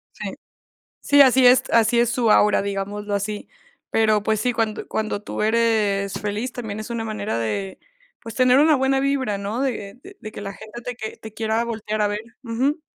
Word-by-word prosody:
Sí. - - -6 0.7
Sí, 285 0 +4
así 260 -1 +5
es 250 +1 +7
así 230 +1 +4
es 240 -1 +2
su 235 -2 +1
aura, 210 -1 +4
digámoslo 200 +1 -3
así. 205 +1 -3 0.4
Pero, 215 -2 +2
pues 215 0 0
sí, 250 -1 +1
cuando 225 -2 -2
cuando 215 -1 -2
tú - - -4
eres 215 -3 +1
feliz 210 +4 -3
también 215 -3 -5
es 215 - -8
una 230 -1 -3
manera 215 - -3
de, 190 - -3 0.4
pues, 230 -2 -8
tener 255 0 +4
una 305 +1 +5
buena 265 0 +2
vibra, 270 -7 0
¿no? 205 +5 -3
De 260 - -5
de 215 - -8
que - - -8
la 200 -1 -5
gente 220 +4 -10
te 245 0 -6
que 220 -2 -6
te 220 - -11
quiera 220 +1 -1
voltear 215 -2 -3
a 205 - +2
ver, 205 0 -3 0.2
ujú. 260 +7 -1
220 Hz, 195 wpm, -22 LUFS, 205-245 Hz, 0.7 s, es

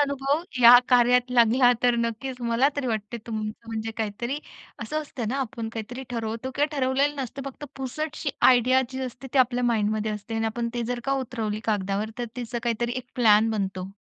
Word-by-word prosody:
अनुभव 280 +2 0 0.2
या 240 +1 +11
कार्यात 250 0 +4
लागला 245 +1 +5
तर 245 -1 +4
नक्कीच 235 +3 -3
मला 235 +3 +2
तरी 280 -2 -1
वाटते 220 -1 -3
तुम 220 -2 -3 0.3
म्हणजे 225 0 -4
काहीतरी 230 +5 -3 0.4
असं 310 0 -2
असतं 250 -6 -5
ना, 255 - -1
आपण 235 -3 -4
काहीतरी 235 +3 -6
ठरवतो 230 +1 -3
किंवा 290 +1 +2
ठरवलेलं 275 +3 +1
नसतं 265 +2 -6
फक्त 275 +2 -7
पुसटशी 285 +3 -3 0.2
आयडिया 255 +1 +4
जी 260 0 -5
असते 250 +1 -8
ती 275 - +2
आपल्या 250 -1 +3
माइंडमध्ये 215 -2 0
असते 210 +2 -6
आणि 225 0 0
आपण 235 +1 -2
ते 240 - -1
जर 245 - -4
का 275 - 0
उतरवली 220 -4 -3
कागदावर 205 0 -1
तर 240 - -1
त्याच 240 -1 -6
काहीतरी 235 0 -1
एक 255 -1 -5
प्लॅन 225 -3 +5
बनतो. 190 -3 -3
240 Hz, 185 wpm, -25 LUFS, 225-260 Hz, 0.4 s, या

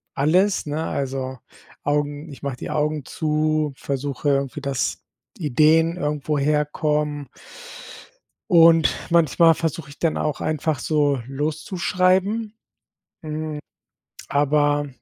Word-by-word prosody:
alles, 185 +8 +2
ne, 150 +2 -2
also, 130 -1 -3 0.5
Augen 145 +1 -1
ich 140 - -12
mach 140 -3 -3
die - - -7
Augen 150 -2 -1
zu, 155 -1 0
versuche 140 +1 -3
irgendwie, 140 +1 0
dass 135 -2 -2 0.3
Ideen 160 +3 +3
irgendwoher 150 -1 0
kommen 150 -1 -2 1.2
und 165 -2 +6
manchmal 165 0 +5
versuche 155 -3 -3
ich 145 - -14
dann 165 -2 0
auch 150 -2 -2
einfach 155 -2 -1
so, 145 -2 +1
loszuschreiben, 185 +8 0 0.7
hm, 155 -1 -4 0.7
aber 145 0 +2
150 Hz, 105 wpm, -22 LUFS, 145-160 Hz, 1.2 s, und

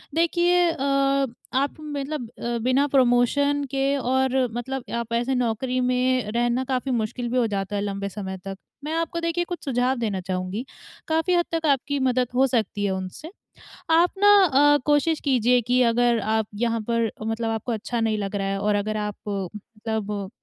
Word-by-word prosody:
देखिए 345 +1 +3
अ, 275 -1 +1 0.3
आप 275 +2 0
मतलब 290 -4 -5
अ, 235 0 -2
बिना 260 +4 +2
प्रमोशन 270 +3 +3
के 275 0 +1
और 260 0 +1
मतलब 255 +2 -4
आप 235 0 -3
ऐसे 245 +3 0
नौकरी 250 +1 -1
में 250 -2 +1
रहना 240 +2 +1
काफ़ी 255 +1 -1
मुश्किल 240 +1 -2
भी 255 - -1
हो 245 - +3
जाता 200 -1 -3
है 200 - 0
लंबे 200 -1 -3
समय 190 -1 -6
तक। 195 0 -5 0.3
मैं 305 +2 -3
आपको 330 +1 -1
देखिए 335 +1 0
कुछ 350 0 -6
सुझाव 255 -1 +1
देना 215 -5 -2
चाहूँगी, 185 +5 -3 0.4
काफ़ी 325 +3 +1
हद 345 -1 +3
तक 330 -1 -1
आपकी 280 0 +1
मदद 255 -1 +1
हो 265 +1 +4
सकती 215 -5 -1
है 195 - +1
उनसे। 190 - -5 0.6
आप 335 +2 +4
ना 410 +1 +7 0.4
अ, - - +5
कोशिश 295 +2 +2
कीजिए 250 -3 +3
कि 250 +2 +2
अगर 235 0 +3
आप 220 0 0
यहाँ 230 -1 +1
पर 230 -1 +1
मतलब 225 +1 -2
आपको 225 +2 -3
अच्छा 230 +2 -3
नहीं 220 -1 +1
लग 200 0 -3
रहा 195 -1 -1
है 195 0 -1
और 210 +1 +1
अगर 215 +1 -1
आप 210 -1 -3
मतलब 210 +1 -4
245 Hz, 180 wpm, -24 LUFS, 215-275 Hz, 0.6 s, ना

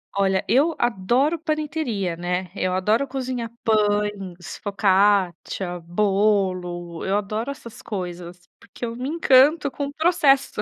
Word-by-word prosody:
Olha, 195 -1 +1
eu 285 - +3
adoro 240 - +1
panetteria, 300 - -2
né. 180 +1 -3
Eu 185 -1 -1
adoro 215 +8 +1
cozinhar 255 -3 -4
pães, 205 -5 -1
focaccia, 195 -2 +1
bolo. 185 -2 0
Eu 195 +1 +1
adoro 215 +4 -3
essas 235 -5 -9
coisas, 180 -3 -7
porque - - -8
eu 230 0 -5
me 255 +3 -4
encanto 290 -1 +4
com 285 - -3
o 280 - -8
processo. 300 -4 +2
210 Hz, 125 wpm, -23 LUFS, 185-260 Hz, -, encanto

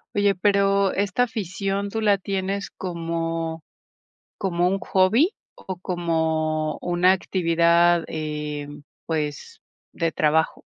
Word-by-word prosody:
Oye, 205 -1 +3
pero 200 0 +2
esta 200 +3 0
afición, 200 -3 -2
¿tú 225 - -2
la 205 -2 +4
tienes 195 +1 -3
como 165 -2 -3 0.7
como 175 -2 0
un 195 +2 +1
hobby? 220 - +3 0.2
¿O 190 -1 -7
como 160 -3 -1
una 180 +1 +3
actividad, 170 -2 +3
eh, 150 -2 -4
mm, 145 0 -11 0.3
pues, 155 - -4 0.3
de 165 -1 -1
trabajo? 160 +1 +1
175 Hz, 110 wpm, -24 LUFS, 160-195 Hz, 0.7 s, la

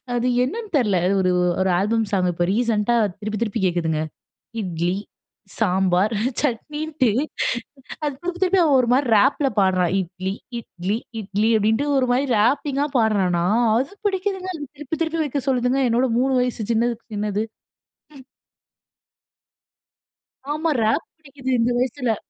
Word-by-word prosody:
அது 240 +1 0 0.2
என்னன்னு 435 - -4
தெரில. 210 -8 +2
அது 195 +2 +2
ஒரு, 185 0 +2 0.3
ஒரு 190 - +2
ஆல்பம் 225 +3 +1
சாங், 185 -3 +2
இப்ப 175 +1 0
ரீசென்ட்டா 230 0 +1 0.2
திருப்பி, 215 0 -4
திருப்பி 225 -1 -1
கேட்குதுங்க. 165 -3 0 0.6
இட்லி, 175 -2 -1 0.7
சாம்பார் 190 0 +2 0.3
சட்னின்னுட்டு, 295 +1 -1 0.9
அது 290 - 0
திருப்பி, 360 +1 -4
திருப்பி 375 0 +4
அவன் 290 -4 +4
ஒருமாரி 250 +3 +2
ரேப்ல 270 +5 +3
பாடுறான். 185 -2 +2
"இட்லி, 185 +1 -4 0.3
இட்லி, 200 -2 -3 0.2
இட்லி" 205 +2 0
அப்பிடின்ட்டு 220 +6 +1
ஒருமாரி 255 +1 +2
ராப்பிங்கா 275 +5 +1
பாட்றானா! 190 -6 +2 0.3
அது 270 +10 -1
பிடிக்குதுங்க. 380 -1 -1
அது 295 - -6
திருப்பி, 300 +2 -4
திருப்பி 325 0 -1
வைக்க 285 -1 -2
சொல்லுதுங்க, 255 +1 +1
என்னோட 245 +3 +2
3 265 +1 +2
வயசு 240 -4 -2
சின்னதுக்கு 235 0 -1
சின்னது. 210 0 -1 0.7
ம். 265 - -13 2.3
ஆமா 315 +2 0
ரேப் 220 +9 +1
பிடிக்குது 275 -4 -7
இந்த 235 +1 +2
வயசுல. 250 -1 0
235 Hz, 130 wpm, -22 LUFS, 200-280 Hz, 2.3 s, திருப்பி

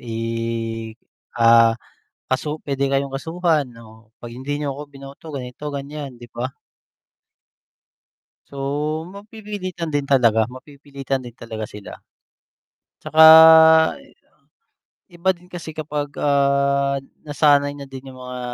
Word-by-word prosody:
i 115 -2 -7 1.2
ah 115 -1 +5 0.5
kasu 150 +4 -2
pwede 140 -1 -1
kayong 135 0 -1
kasuhan 160 -2 -1
o 110 0 -18
'pag 120 -1 -9
hindi 145 +3 -4
niyo 140 -2 -3
ako 145 - -7
binoto 140 +2 -13
ganito, 125 +1 -8
gan'yan, 140 -1 -7
'di 120 - -11
ba? 125 +2 -4 2.0
So, - - -15 0.6
mapipilitan 200 -4 -7
din 145 -1 -1
talaga, 115 -5 +3
mapipilitan 135 +1 -6
din 120 -1 -11
talaga 110 -2 -7
sila. 105 -1 -11 1.0
'Tsaka, 160 0 +2 1.9
iba 175 +2 0
din 180 +1 -20
kasi 175 -3 -8
kapag, 150 -1 -4
ah 140 -1 +1 0.2
nasanay 145 -1 +2
na 140 - -8
din 135 0 -10
yung 130 - -13
mga 125 0 -8
140 Hz, 115 wpm, -21 LUFS, 125-150 Hz, 2.0 s, ah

